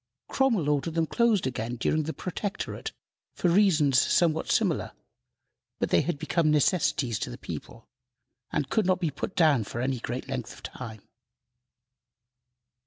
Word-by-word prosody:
Cromwell 230 - +2
ordered 150 +2 0
them 165 -1 +2
closed 230 +2 +2
again 120 -2 -3
during 155 +6 +1
the 155 +1 -3
Protectorate 190 +2 -4 0.4
for 180 - +1
reasons 160 -9 +4
somewhat 160 -2 +2
similar; - - +1 0.8
but - - -2
they - - +5
had 175 -4 -2
become 155 +1 +1
necessities 145 - +2
to - - -3
the - - -7
people, 115 - -8 0.6
and 140 - -1
could 215 +5 +1
not 185 -1 +2
be 165 -4 0
put 145 +7 -5
down 150 -8 +4
for 115 - -6
any 130 0 -1
great 120 +3 -5
length 125 -2 -4
of - - -15
time. 110 -5 -8
150 Hz, 150 wpm, -27 LUFS, 130-175 Hz, 0.8 s, they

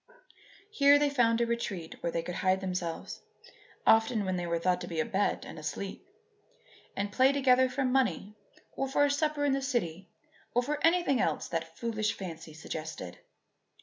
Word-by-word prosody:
Here 285 -7 +6
they 290 0 +2
found 235 -4 +3
a - - +3
retreat 210 -8 -4
where 170 - -1
they 165 - -2
could 180 - -5
hide 185 +1 +1
themselves 180 -3 -4 0.6
(often 225 -1 +4
when 185 -1 -1
they 175 -1 -3
were 170 0 0
thought 180 +2 +1
to - - -5
be 165 -2 -4
abed 195 +5 0
and - - -9
asleep) 175 +6 -5 0.9
and 200 +1 -2
play 260 +5 +4
together 260 -2 +4
for 265 +1 -1
money 250 -6 +1 0.4
or 270 - -2
for 290 +2 +3
a 285 - +1
supper 295 0 0
in 280 - +2
the 275 - 0
city 190 - -2 0.5
or 245 - +3
for 295 +3 -3
anything 330 -5 +3
else - - -1
that - - -4
foolish 220 -2 -1
fancy 165 -4 -8
suggested. 155 - -7
220 Hz, 175 wpm, -30 LUFS, 175-270 Hz, 0.9 s, Here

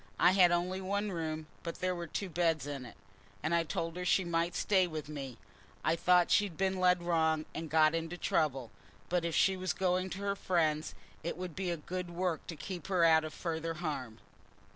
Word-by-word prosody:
I 175 - +6
had 185 -2 +6
only 180 +2 0
one 200 +2 -1
room, 160 -2 -3 0.2
but 170 - -5
there 185 0 -1
were 175 -1 -5
two 195 +5 -3
beds 165 -3 +1
in 140 -3 -5
it, - - -14 0.5
and 160 +2 0
I 170 - +4
told 165 +1 -3
her 180 - -3
she 180 +1 +3
might 170 0 0
stay 190 -3 +3
with 155 -3 -5
me. 135 -5 -6 0.5
I 160 - +3
thought 180 +1 +4
she'd 200 -6 +2
been 190 -1 0
led 180 -1 +3
wrong, 160 -2 +1
and 160 0 -5
got 155 0 +5
into 165 +1 -3
trouble, 135 -9 0 0.4
but 175 -1 +1
if 170 - -1
she 195 - +4
was 185 0 -2
going 185 0 0
to 190 +2 -6
her 200 0 0
friends, 160 -5 0 0.3
it 165 +1 -4
would 180 -3 -6
be 190 -1 -2
a 170 - -1
good 180 +3 -5
work 175 -2 -2
to 165 - -5
keep 175 +3 -6
her 185 -3 +2
out 160 -1 +6
of 155 - -5
further 165 -1 -3
harm." 145 -9 -4
170 Hz, 210 wpm, -32 LUFS, 160-185 Hz, 0.5 s, I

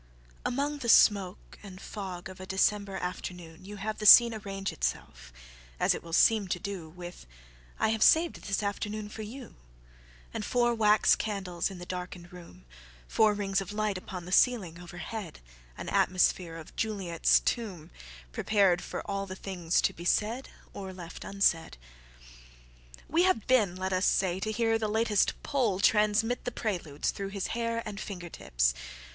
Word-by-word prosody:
IAMONG 285 +3 -1
the 235 - -2
smoke 200 -4 +3
and 190 -3 -11
fog 190 -4 -7
of 185 -1 -11
a 185 - -8
December 195 +1 +1
afternoonYou 180 +1 -7
have 215 +2 -4
the 210 - +1
scene 235 +2 +10
arrange 195 -2 -4
itself——as - - -3
it - - -5
will 165 - -11
seem 210 +4 +4
to 180 - -1
do—With 175 - -8 0.5
"I - - +2
have 220 0 -1
saved 325 +6 +4
this 195 +1 -2
afternoon 210 +1 -3
for 220 - -8
you";And - - -11
four 240 -1 +2
wax 215 -2 +4
candles 195 -5 -3
in 190 - -9
the 175 - -8
darkened 180 -1 -7
room, 170 - -13 0.4
Four 215 - +3
rings 195 -1 0
of 195 - -7
light 215 -1 -1
upon 185 -1 -7
the 180 - -8
ceiling 190 -6 +2
overhead, 175 +2 -7 0.4
An - - -7
atmosphere 180 -2 +1
of 165 -2 -11
Juliet's 195 -7 +2
tombPrepared 175 - -1
for - - -6
all 195 0 -3
the 185 - -6
things 180 -4 -1
to - - +2
be 170 - -10
said, 220 +8 0 0.2
or 190 -1 -7
left 175 -2 -9
unsaid. 175 - +1 1.3
We 330 +3 +2
have 245 - +1
been, 215 -9 +3
let 190 +1 -3
us 185 +1 +1
say, 185 -1 +1
to 215 +3 -2
hear 225 0 +1
the 220 - -1
latest 215 -1 +2
PoleTransmit 220 -1 +2
the 245 - -3
Preludes, 175 -11 -2
through 195 -1 -5
his 195 -1 -4
hair 230 0 -2
and 205 -2 -6
finger 180 -5 -7
tips. - - 0
195 Hz, 155 wpm, -29 LUFS, 175-215 Hz, 1.3 s, scene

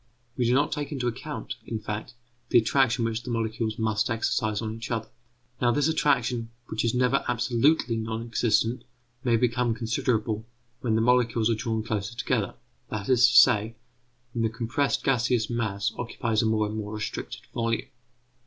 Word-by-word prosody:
We 125 - 0
do 120 +2 +3
not 145 +2 +2
take 145 0 -3
into 135 -4 -2
account, 120 - -5
in 115 - -2
fact, 105 +2 -5 0.3
the - - +5
attraction 120 0 +3
which 115 0 -2
the 120 - -8
molecules 115 -1 -2
must 110 +1 0
exercise 110 -1 0
on 110 -1 -3
each 115 +1 -7
other. 110 -2 -2 0.5
Now, 120 - +4
this 145 +5 +2
attraction, 125 -7 +1 0.2
which 110 - -1
is 115 0 +1
never 125 +2 +2
absolutely 125 +1 +2
non 110 0 -3
existent, 115 +1 +1 0.4
may 120 -3 +3
become 120 0 +1
considerable 115 -1 -1 0.3
when 115 -3 0
the 110 - +2
molecules 120 -1 +3
are - - +4
drawn 110 0 -2
closer 110 -1 -3
together; - - -1 0.3
that 105 0 -4
is 125 0 +6
to - - -1
say, 110 +2 +6 0.6
when 115 - -1
the 115 - +2
compressed 130 +5 -1
gaseous 120 -3 +1
mass 105 -4 -1
occupies 115 -2 -1
a 115 - +1
more 110 -1 +2
and 105 +1 -4
more 105 0 -4
restricted 105 - -5
volume. 115 -1 -1
115 Hz, 170 wpm, -27 LUFS, 110-125 Hz, 0.6 s, is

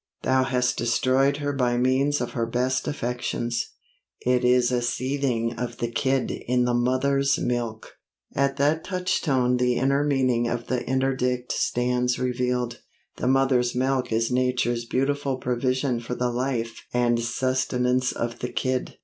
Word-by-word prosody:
Thou 130 0 +3
hast 125 -2 0
destroyed 130 +4 +2
her 145 -1 -2
by 125 -3 +1
means 130 +3 +2
of 120 - -3
her 115 -2 -1
best 125 +2 0
affections. 120 -3 -2 0.5
It 125 0 +2
is 125 0 +4
a 125 -1 +1
seething 125 -2 -1
of 125 -1 -4
the 120 - -2
kid 130 +2 0
in 125 0 0
the 125 - +1
mother's 135 +3 +2
milk!' 120 -3 -3 0.4
At 140 0 +1
that 150 +3 +2
touchstone 140 -9 +1
the 125 0 +2
inner 140 +3 +2
meaning 130 -4 +1
of 120 0 -3
the 125 -1 -1
interdict 130 -2 0
stands 125 0 0
revealed. 125 -1 -1 0.4
The - - -2
mother's 130 -2 +2
milk 130 0 0
is 115 +2 +1
Nature's 125 -2 0
beautiful 135 +2 0
provision 125 0 0
for 120 +1 -5
the 125 0 0
life 120 -2 -2
and 120 -1 +2
sustenance 125 +1 0
of 120 0 -4
the 125 - -3
kid. 130 -1 -2
125 Hz, 150 wpm, -25 LUFS, 120-130 Hz, 0.5 s, is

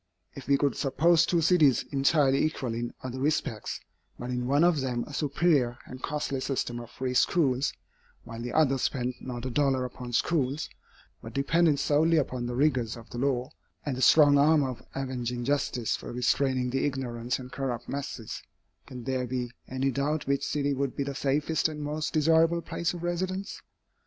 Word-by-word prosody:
If 135 - -10
we 140 0 +4
could 140 0 +1
suppose 160 +4 +3
two 170 -2 +2
cities 155 -6 +4
entirely 140 -1 +3
equal 140 -6 -1
in 120 +1 -3
other 130 0 -5
respects, 135 -6 -1 0.4
but 125 +1 -5
in 125 0 -2
one 140 +4 +3
of 170 -5 +3
them 125 -2 -1
a 150 - -11
superior 140 -4 +1
and 130 0 -10
costly 145 -2 -2
system 125 -3 -2
of 120 -1 -9
free 130 +1 -3
schools, 135 -1 +2 0.5
while 115 -1 -8
the 120 - -4
other 135 -4 +3
spent 125 0 -1
not 125 -1 -6
a 130 - -3
dollar 135 -1 +1
upon 125 0 -7
schools, 145 +1 0 0.5
but 115 - -9
depended 150 +2 +3
solely 155 +3 +3
upon 125 -4 -1
the 120 - -3
rigors 125 -5 +1
of 115 0 -13
the 120 - -5
law 130 0 0 0.3
and 140 -3 -1
the 130 - -5
strong 145 +1 +6
arm 150 +1 +5
of 130 -3 -4
avenging 125 -2 -3
justice 140 -4 0
for - - -8
restraining 125 +1 +1
the 135 - 0
ignorant 125 -3 -2
and 125 -1 -10
corrupt 125 -4 -3
masses, 135 -5 -5 0.5
can 125 -3 -8
there 130 -1 -1
be 125 -1 -3 0.2
any 130 +1 -1
doubt 145 +4 -1
which 140 0 0
city 145 -1 0
would 135 -1 -2
be 140 - -1
the 140 0 -4
safest 145 +4 +1
and 155 -1 -7
most 150 +1 -2
desirable 165 +2 +3
place 170 +1 -2
of 175 - -7
residence? 185 +3 -3
135 Hz, 180 wpm, -28 LUFS, 125-150 Hz, 0.5 s, strong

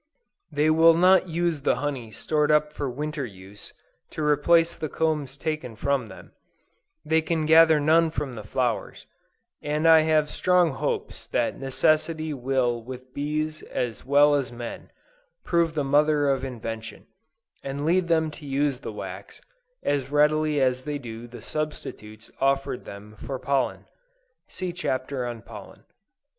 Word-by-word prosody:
They 150 +2 +2
will 165 +1 +6
not 185 +1 +5
use 170 -2 -1
the - - +2
honey 135 -6 -4
stored 150 +7 0
up 150 0 +3
for 140 -3 -3
winter 150 +3 -4
use 100 -2 -11 0.4
to 155 - -5
replace 165 +3 +3
the 155 -2 -4
combs 150 -4 -1
taken 155 -7 -4
from 135 0 -1
them; - - -13 0.7
they 160 +1 +3
can 160 -1 -1
gather 160 0 +6
none 160 +3 +4
from 145 -4 -4
the 110 -3 -7
flowers; 120 +1 -2 0.6
and 150 +2 0
I 160 -1 +8
have 155 -1 +2
strong 180 -3 +3
hopes 135 - -4
that - - -1
necessity 155 +4 +1
will 125 -2 0
with 130 +2 -10
bees 155 +2 -2
as 115 -4 -4
well 145 +2 +5
as 135 -4 0
men, 120 -1 -7 0.5
prove 170 -2 +1
the 150 - 0
mother 145 +1 +3
of 135 -1 -1
invention, 115 -4 -6 0.6
and 140 +1 -4
lead 175 +2 +2
them 160 -2 +2
to 150 - -12
use 140 -1 0
the - - -6
wax, 95 -2 -8 0.4
as 140 -2 0
readily 150 +1 +2
as 130 -1 +1
they 150 0 -3
do 120 -3 -8
the 120 +1 -11
substitutes 110 -8 -6
offered 135 -1 0
them 105 +2 -10
for 135 - -4
pollen. 130 0 -1 0.6
(See 185 -2 -5
Chapter 130 -6 -2
on 120 -2 -7
Pollen.) - - -12
145 Hz, 150 wpm, -25 LUFS, 125-155 Hz, 0.7 s, I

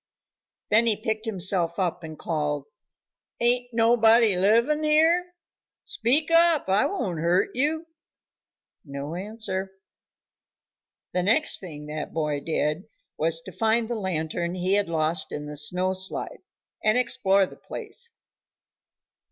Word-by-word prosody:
Then 225 +2 +5
he 220 - +3
picked 220 0 -3
himself 185 -4 +1
up 180 -2 -1
and 155 -1 -8
called. 150 -3 -2 0.7
"Ain't 245 +1 +3
nobody 225 -2 +4
livin' 235 +11 +3
here? 330 +4 +3 0.5
Speak 290 +8 0
up, 330 - +4
I 195 +2 +3
won't 190 - -3
hurt 170 +3 +2
you." 310 +5 0 1.0
No 140 +1 -6
answer. 195 0 -4 1.4
The 180 - +1
next 225 +12 +3
thing 150 -6 -9
that 150 0 -6
boy 150 -3 -1
did 155 +3 -1 0.3
was 165 +1 -1
to - - -10
find 225 +1 +1
the 240 - -3
lantern 175 -4 -2
he 185 +1 0
had 205 -3 +1
lost 160 0 0
in 150 - -5
the 150 0 -7
snow 180 +6 -2
slide, 190 0 -3 0.4
and 215 +2 +3
explore 200 -5 +2
the - - -12
place. 470 -1 -8
190 Hz, 125 wpm, -25 LUFS, 165-235 Hz, 1.4 s, Then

